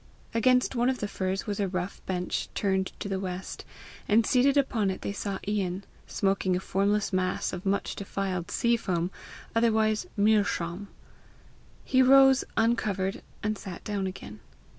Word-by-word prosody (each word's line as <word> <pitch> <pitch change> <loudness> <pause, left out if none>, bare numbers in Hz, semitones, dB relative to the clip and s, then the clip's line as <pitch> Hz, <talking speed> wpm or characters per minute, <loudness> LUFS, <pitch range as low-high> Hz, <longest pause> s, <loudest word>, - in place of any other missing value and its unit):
Against 250 +3 +3
one 240 +1 +2
of 260 - 0
the 210 - -3
firs 190 -1 -2
was 205 -2 -3
a 200 - +1
rough 180 0 -4
bench 180 -1 -2
turned 190 -2 0
to - - -4
the 195 -1 -2
west, 185 -1 -5 0.4
and 220 +1 +4
seated 270 +3 +3
upon 230 -7 +2
it 190 - -4
they - - -2
saw 200 -1 -3
Ian, 195 -2 -1 0.2
smoking 195 -2 +1
a - - 0
formless 200 +2 0
mass 185 0 0
of 180 +2 -5
much 200 +1 0
defiled 195 -3 -3
sea 235 0 +2
foam, 180 -5 -1 0.4
otherwise 220 -2 +2
meer 210 0 +4
schaum. 175 +1 -3 1.0
He 260 - +4
rose, 270 0 +7
uncovered, 210 -4 +1 0.2
and 215 -1 -1
sat 185 -3 -8
down 200 -2 -2
again. 185 - -8
200 Hz, 160 wpm, -28 LUFS, 190-220 Hz, 1.0 s, rose